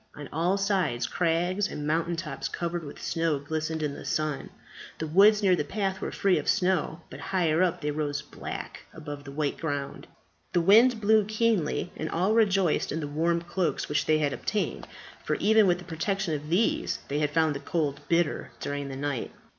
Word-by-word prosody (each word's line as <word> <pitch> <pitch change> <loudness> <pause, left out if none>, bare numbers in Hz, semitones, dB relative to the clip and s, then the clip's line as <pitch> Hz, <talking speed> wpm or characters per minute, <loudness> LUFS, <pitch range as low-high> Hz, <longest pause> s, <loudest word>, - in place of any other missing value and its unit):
On 145 -1 -8
all 175 +5 +1
sides 190 -12 0
crags 175 +6 0
and 150 - -5
mountain 165 +3 0
tops 155 -5 -4
covered 170 0 -3
with 145 - -9
snow 165 -3 0
glistened 155 +2 -3
in 145 -2 -1
the - - -9
sun. 155 -3 -2 0.5
The 160 - -3
woods 205 +6 +5
near 185 -2 +5
the 150 - -1
path 190 +4 -2
were - - -3
free 195 -2 +2
of - - -7
snow; 180 -4 +1
but - - -8
higher 170 -3 +1
up 185 -2 +1
they 150 0 -1
rose 145 -1 -2
black 145 - -7 0.2
above 145 -2 -8
the 140 - -8
white 145 0 -1
ground. 145 -4 -4 0.5
The 175 - +3
wind 220 +6 +6
blew 215 +1 +5
keenly, 215 -6 0
and 160 - -4
all 185 +5 +1
rejoiced 195 -7 +2
in 160 - -2
the 150 - -3
warm 165 +3 0
cloaks 175 0 -1
which 150 - 0
they 155 - +4
had 145 -3 0
obtained; 210 0 -2 0.4
for - - 0
even 220 -1 +4
with 175 -1 +3
the 180 - -10
protection 185 +1 -2
of 150 0 -4
these 185 +7 +1
they 145 +1 -1
had 150 -1 +1
found 160 -2 +2
the 140 - -5
cold 145 -1 -1
bitter 170 -2 +1
during 145 -1 -4
the 135 - -6
night. 140 -3 -2
165 Hz, 195 wpm, -27 LUFS, 150-190 Hz, 0.5 s, wind